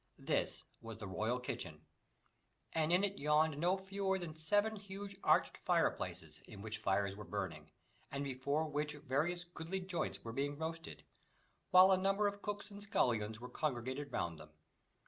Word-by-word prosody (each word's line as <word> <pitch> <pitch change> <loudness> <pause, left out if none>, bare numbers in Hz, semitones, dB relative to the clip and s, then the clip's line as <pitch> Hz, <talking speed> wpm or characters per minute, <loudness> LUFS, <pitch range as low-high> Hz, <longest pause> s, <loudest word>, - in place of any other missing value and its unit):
This - - 0 0.2
was 115 -1 -7
the 110 - -6
royal 110 +6 0
kitchen, 125 - -5 0.9
and 160 0 +2
in 180 +3 +5
it 200 0 0
yawned 150 0 +3
no 180 +4 +3
fewer 190 0 -1
than 175 -4 -5
seven 205 +7 +2
huge 200 0 -7
arched - - +4
fireplaces, - - 0
in 100 - -9
which 110 0 -4
fires 100 0 +1
were 105 - -7
burning, 85 - -4 0.4
and 140 0 -2
before 140 +3 0
which 150 0 -1
various 150 +5 0
goodly 175 +1 -4
joints 185 -2 -3
were 115 - -5
being 145 +3 -1
roasted, 165 +1 -5 0.7
while 185 +1 +9
a 190 - +6
number 195 +2 +3
of 205 0 0
cooks 205 0 -4
and 205 0 -8
scullions 110 - +1
were 125 - -6
congregated 135 0 -2
round 85 -7 -2
them. 75 - -11
155 Hz, 165 wpm, -37 LUFS, 125-190 Hz, 0.9 s, while